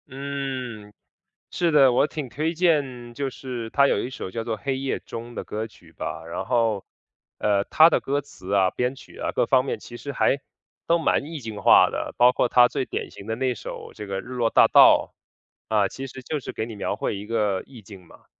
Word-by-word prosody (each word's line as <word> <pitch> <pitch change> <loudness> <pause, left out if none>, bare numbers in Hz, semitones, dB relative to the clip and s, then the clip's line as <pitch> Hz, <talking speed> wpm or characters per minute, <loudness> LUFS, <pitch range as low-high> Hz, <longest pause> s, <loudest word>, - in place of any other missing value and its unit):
嗯， 130 -6 -5 0.6
是 170 -2 +1
的， 135 -4 +6
我 140 - +3
挺 150 -3 -5
推 155 +6 -2
荐 140 -9 0
就 140 +2 -2
是 125 -3 -6
他 140 +4 +4
有 - - +1
一 - - -4
首 130 - -6
叫 115 +3 -3
做 115 -1 -3
《黑 135 -1 -1
夜 135 0 -2
中》 115 +1 -8
的 - - -4
歌 110 +1 -4
曲 90 -7 -20
吧。 80 - -6
然 85 - -4
后， 115 -5 +1 0.5
呃， 100 -1 +1
他 160 +1 +6
的 - - +2
歌 140 +1 0
词 95 -8 -11
啊、 95 -2 +3
编 125 +2 -1
曲 - - -15
啊 - - -2
各 - - +2
方 130 -1 +3
面， - - -3
其 120 - -11
实 140 - -6
还 140 - +2 0.5
都 170 - +4
蛮 155 - +1
意 160 -1 -6
境 110 -5 -7
化 - - +7
的， - - -4
包 125 +1 +6
括 125 - +1
他 120 -1 +6
最 130 - -2
典 - - -4
型 100 - -11
的 110 - -2
那 130 +2 0
一 - - -3
首 - - -8
这 105 - -8
个 100 0 -3
《日 - - -13
落 120 -2 +1
大 - - +6
道》。 - - +6 0.6
啊， 105 -2 +4
其 135 +7 -7
实 130 +1 -10
就 150 +3 -3
是 - - -6
给 110 - -3
你 115 -1 -8
描 100 - -2
绘 110 - -2
一 100 - -7
个 105 -4 0
意 125 -5 -13
境 95 -3 -13
嘛。 - - -19
125 Hz, 245 characters per minute, -24 LUFS, 110-135 Hz, 0.6 s, 化